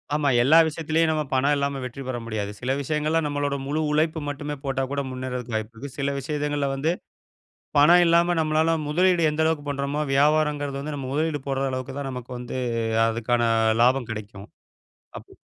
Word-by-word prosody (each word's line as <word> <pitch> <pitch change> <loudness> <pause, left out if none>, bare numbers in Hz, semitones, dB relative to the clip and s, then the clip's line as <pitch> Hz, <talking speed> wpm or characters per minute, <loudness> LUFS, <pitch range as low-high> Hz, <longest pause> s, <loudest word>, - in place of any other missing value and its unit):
ஆமா. 145 -2 +1
எல்லா 155 +5 +6
விஷயத்துலயும் 160 +1 0
நம்ம 155 -1 0
பணம் 140 +3 +3
இல்லாம 140 -1 -1
வெற்றி 130 +2 -7
பெற 125 -2 -2
முடியாது. 105 -3 -3
சில 125 +1 -2
விஷயங்கள்ல 155 +3 0
நம்மளோட 145 -1 -1
முழு 155 +2 -1
உழைப்பு 155 +2 +1
மட்டுமே 145 +1 -4
போட்டா 135 -1 -1
கூட 140 0 -1
முன்னேறதுக்கு 125 -2 -5
வாய்ப்புருக்கு. 115 +5 -5
சில 140 0 0
விஷயங்களில 145 0 -2
வந்து, 150 +5 0 0.9
பணம் 170 +5 +7
இல்லாம 170 +1 +3
நம்மளால 160 +1 +2
முதலீடு 175 +1 +3
எந்த 160 +1 0
அளவுக்கு 155 -2 0
பண்ணுறோமோ, 140 +1 -2
வியாபாரங்குறது 145 -1 +2
வந்து 150 0 -4
நம்ம 130 -2 -5
முதலீடு 155 -1 -1
போடுற 135 0 -1
அளவுக்கு 130 +1 -5
தான் 135 -1 -4
நமக்கு 125 0 -8
வந்து 125 +1 -6 0.5
அதுக்கான 120 +1 0 0.4
லாபம் 125 -1 +2
கிடைக்கும். 105 -2 -8 0.7
அப்போ - - -17
145 Hz, 165 wpm, -24 LUFS, 130-155 Hz, 0.9 s, பணம்